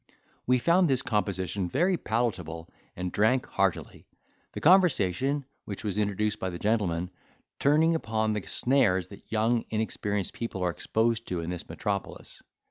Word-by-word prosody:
We 125 +1 +4
found 170 +6 +3
this 130 -1 +1
composition 95 -4 -1
very 175 - +2
palateable, 95 - -2 0.3
and 90 0 -3
drank 110 +5 +2
heartily; - - -2 0.5
the - - -4
conversation, 140 - +3 0.2
which 100 +1 -6
was 105 -1 -2
introduced 105 +1 0
by 95 - -2
the 85 - -6
gentleman, 90 -5 0 0.5
turning 155 +4 +4
upon 110 -8 0
the 105 - -2
snares 95 - +2
that 100 - -14
young 115 +1 +2
inexperienced 105 -3 -2
people 105 -5 -4
are 90 - +1
exposed 115 +5 0
to 90 -2 -2
in 85 +1 -4
this 90 -1 -6
metropolis. 100 -2 -4
110 Hz, 145 wpm, -28 LUFS, 95-125 Hz, 0.5 s, We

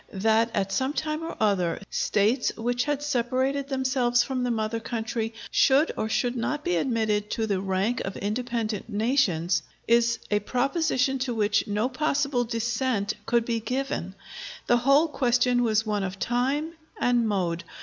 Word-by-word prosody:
That 220 +3 +2
at 195 0 0
some 260 +8 0
time 310 0 -2
or 325 - -6
other, 195 -6 +1
States 215 +5 +1
which 245 +2 -1
had 290 -1 -1
separated 265 +1 0
themselves 255 -3 +2
from 260 0 -3
the 250 - 0
mother 225 0 -1
country 225 0 -3 0.2
should 280 +4 +4
or 220 - -2
should 245 +2 0
not 295 +5 -2
be 175 - 0
admitted 215 -1 0
to 225 - -1
the 200 -3 -1
rank 195 +5 0
of 195 - -5
independent 225 0 -3
nations, 205 - +1 0.3
is 235 0 +3
a 210 - +3
proposition 265 +2 0
to 250 -2 -2
which 210 -1 +1
no 210 +3 0
possible 280 -1 0
dissent 230 -2 -1
could 235 -1 +2
be 230 -1 -1
given. 230 -5 -3 0.5
The 240 - +4
whole 275 +6 +4
question 245 -3 +2
was 225 -1 +2
one 210 -1 -1
of 190 0 -4
time 270 +9 -1 0.3
and 240 -2 +2
mode. 175 -5 -1
235 Hz, 160 wpm, -26 LUFS, 215-260 Hz, 0.5 s, should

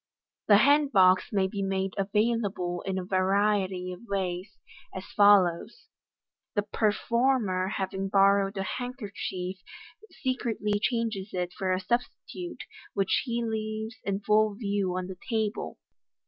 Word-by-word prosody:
The 205 - +8
hand 285 +5 +4
box 185 -2 +5
may 195 -3 +2
be 200 +1 -3
made 195 0 -1
available 200 -3 0
in 190 0 -1
a 185 - -3
variety 190 -1 +1
of 180 - -10
ways, 190 0 -3 0.4
as 190 - -6
follows: 200 - +4 0.7
The 205 - +2
performer 215 -2 +1
having 195 0 -3
borrowed 195 0 +3
a 195 - -1
handkerchief, 200 -6 -5 0.5
secretly 225 -5 -2
changes 220 -6 -1
it 180 -1 -2
for 190 -1 -2
a 185 - +1
substitute, 245 - -4 0.3
which 195 -2 +2
he 235 -1 -1
leaves 220 0 -4
in 200 0 -2
full 215 0 +3
view 200 -4 -1
on 185 - -2
the 185 -1 -8
table. 220 -2 -2
200 Hz, 130 wpm, -28 LUFS, 190-220 Hz, 0.7 s, The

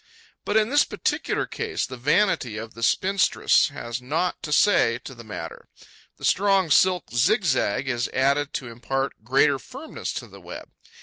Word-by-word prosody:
But, 210 - +1
in 220 +2 +2
this 290 +1 +5
particular - - -2
case, 445 -3 -3
the 130 - -8
vanity 130 - +1
of 110 +1 -7
the 115 - -11
spinstress 190 - +3
has 120 +1 -6
naught 160 +8 -2
to 150 - -6
say 150 - +4
to 135 - -8
the 120 -2 -12
matter: 90 -7 -8 0.5
the - - -6
strong 195 -4 +2
silk 185 +4 +3
zigzag 130 - +1
is 120 -2 -1
added 140 +2 +1
to 125 - -4
impart 130 +1 -4
greater 135 +3 +3
firmness 270 - -7
to - - -5
the - - -14
web. - - -10
140 Hz, 165 wpm, -24 LUFS, 120-195 Hz, 0.5 s, this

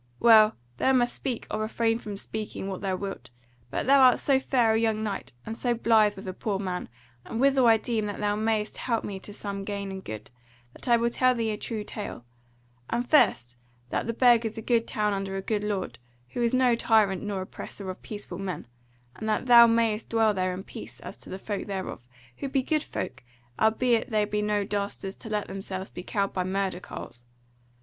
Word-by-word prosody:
Well, 220 -2 +7 0.2
thou 265 - +3
must 245 -1 +3
speak, 245 -4 -4
or 215 - -1
refrain 225 +1 0
from 205 -3 -6
speaking, 215 -1 -5
what 190 -2 -4
thou 190 -2 0
wilt; 195 -11 -6 0.4
but - - -2
thou 275 +2 +6
art 255 -1 +7
so 270 -2 +2
fair 245 -4 +2
a 220 - +3
young 220 -1 +1
knight, 205 -2 -4
and 225 - -4
so 240 0 0
blithe 220 -3 +4
with 195 0 -9
a 185 - -3
poor 200 +1 -2
man, 185 -6 -4 0.3
and 225 - -5
withal 270 -1 +4
I 225 -1 +7
deem 220 -1 -1
that 205 - -5
thou 205 0 +1
mayest 215 0 -1
help 230 -3 -1
me 195 -2 -5
to 205 - -10
some 200 -1 -5
gain 200 -1 -4
and 190 0 -7
good, 110 -1 -7 0.4
that - - -10
I 235 -1 +6
will 235 +1 +1
tell 255 +1 +3
thee 225 -2 0
a 210 - -3
true 215 0 -4
tale: 205 - -6 0.6
and 240 +1 -1
first 125 - +3 0.3
that - - -1
the 230 - -1
Burg 240 -1 +5
is 225 0 -4
a 225 - -5
good 230 -1 +2
town 210 -1 0
under 195 0 -3
a 195 - -2
good 210 -1 -1
lord, 195 - -3 0.3
who 240 - -4
is 235 -1 +2
no 255 -1 +4
tyrant 215 -5 +3
nor 205 -2 -3
oppressor 195 +1 -8
of 185 - -11
peaceful 205 -4 -7
men; 190 -8 -4 0.5
and 220 - -4
that 215 - 0
thou 235 -1 +9
mayest 230 -1 +1
dwell 225 -2 +3
there 185 -1 0
in 190 - -7
peace - - -9
as - - -8
to - - -13
the 190 - -5
folk 205 +1 -4
thereof, 190 -10 -5 0.3
who 275 - -4
be 265 -1 +1
good 310 +3 +1
folk, 130 - -5 0.4
albeit 225 +1 +2
they 215 -2 +2
be 210 0 -1
no 210 -1 +1
dastards 200 -1 -3
to 225 - -8
let 210 -1 -1
themselves 195 -1 -6
be - - -7
cowed 200 +1 -1
by 185 - 0
murder 190 0 -1
carles. 120 -8 -9
215 Hz, 215 wpm, -27 LUFS, 195-230 Hz, 0.6 s, thou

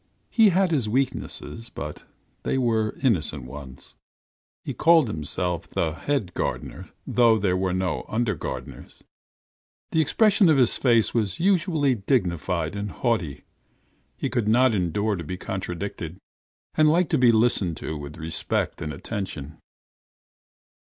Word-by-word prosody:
He 225 -3 +6
had 185 0 +2
his 130 -9 +1
weaknesses, 115 - -2
but 75 -8 -7 0.4
they - - -1
were 110 -4 +1
innocent 80 - +1
ones: 65 0 -10 0.7
he - - -3
called 165 -4 +5
himself 85 -1 -2
the 80 -2 -1
head 110 - -2
gardener, - - -4 0.2
though 115 -2 +4
there 95 -3 +1
were 95 0 0
no 95 0 -1
under 110 -1 0
gardeners; 85 - -7 0.9
the 160 - +3
expression 200 +3 +4
of 155 - +5
his 125 -3 +3
face 115 -4 +3
was 105 -5 -1
unusually 165 -6 +2
dignified 90 - -1
and 100 0 -3
haughty; 95 - -1 0.7
he - - -1
could 120 -3 -1
not 125 +2 +4
endure 100 +3 0
to 85 - -5
be 90 +4 -5
contradicted, 90 -2 -5 0.6
and 155 -1 +4
liked 170 +1 +2
to 155 - +3
be 125 -2 +6
listened 110 -7 +2
to 80 - -5
with 75 0 -8
respect 80 0 -2
and 75 - -3
attention. 80 -3 -6
105 Hz, 135 wpm, -25 LUFS, 85-130 Hz, 0.9 s, He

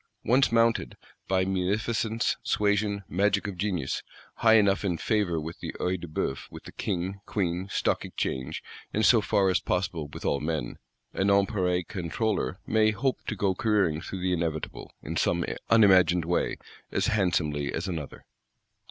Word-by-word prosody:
Once 130 +3 +3
mounted 115 - +2 0.3
(by 95 -1 +2
munificence, 105 +4 0
suasion, 100 -1 +1
magic 100 +2 +1
of 100 -2 -4
genius) 90 -7 -2 0.4
high 110 -1 +5
enough 100 -2 +4
in 90 -4 0
favour 100 -4 0
with 80 +2 -7
the - - -5
Œil 90 -1 -2
de 85 - -6
Bœuf, 75 -3 -3
with - - -11
the - - -10
King, 95 +2 -3
Queen, 90 -2 -1
Stock - - 0
Exchange, 65 +4 -3 0.3
and 110 - +1
so 115 -3 +6
far 100 -1 +2
as 90 - +2
possible 90 -4 -2
with - - -9
all 70 - +1
men, 75 -5 -3 0.3
a - - 0
Nonpareil 95 -2 +2
Controller 95 +2 -2
may 110 0 +3
hope 130 +5 -1
to 110 - -2
go 100 -1 +1
careering 95 -6 +1
through 95 +1 -6
the 90 0 +1
Inevitable, 80 -3 -3
in - - -4
some - - +1 0.2
unimagined 95 -6 +5
way, 90 +1 0 0.3
as - - 0
handsomely 80 -8 +1
as 85 - -3
another. 80 -6 -6
95 Hz, 160 wpm, -27 LUFS, 85-105 Hz, 0.4 s, so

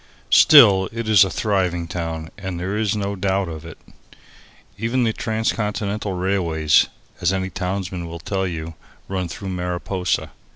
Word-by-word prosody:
Still, 100 - +7
it 115 -1 -5
is 110 -2 +7
a 95 - -1
thriving 90 -3 -1
town 80 -2 -5
and 95 -3 -5
there 95 +3 -3
is 105 -1 0
no 100 -1 -2
doubt 95 0 0
of 80 -2 -7
it. 85 -2 -10 1.0
Even 115 +5 0
the 110 -1 +1
transcontinental 105 -2 -2
railways, 90 -5 +2 0.3
as 90 - +2
any 95 -1 -2
townsman 90 -1 -4
will 85 0 -7
tell 95 +2 -2
you, 80 -2 -5 0.3
run 95 -2 -2
through 95 +4 -7
Mariposa. 90 0 -2
95 Hz, 150 wpm, -21 LUFS, 85-100 Hz, 1.0 s, Still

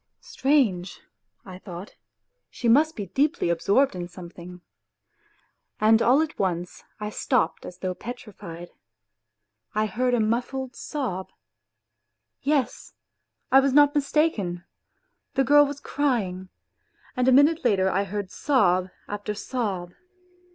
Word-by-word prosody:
" - - -53
Strange," 240 -11 0 0.5
I 185 -1 -10
thought; 185 0 -9 0.3
" - - -53
she 240 - -4
must 300 +7 +4
be 205 - -4
deeply 285 - 0
absorbed 200 +8 +2
in 175 -1 -4
some 175 -1 -11
thing," 180 0 -11 1.2
and 220 +1 +5
all 270 +6 +4
at 315 - -7
once 180 -2 -2 0.2
I 210 0 -4
stopped 250 +2 0
as 180 - -10
though 185 0 -3
petrified. 200 -6 -9 1.0
I 215 0 +2
heard 245 +4 0
a - - +1
muffled 245 +4 -1
sob. 225 -11 -4 1.1
Yes! 280 -2 -1 0.6
I 270 - +8
was 270 -1 +2
not 290 0 +6
mistaken, 280 - 0 0.7
the 270 - +3
girl 290 +2 +6
was 285 0 -6
crying, 205 -12 -1 0.7
and 250 -1 +1
a - - +6
minute 290 +5 +5
later 195 -6 +3
I 195 +1 +1
heard 200 -1 -5
sob 185 -10 +2 0.2
after 205 0 -4
sob. 200 -7 -3
215 Hz, 130 wpm, -25 LUFS, 185-270 Hz, 1.2 s, I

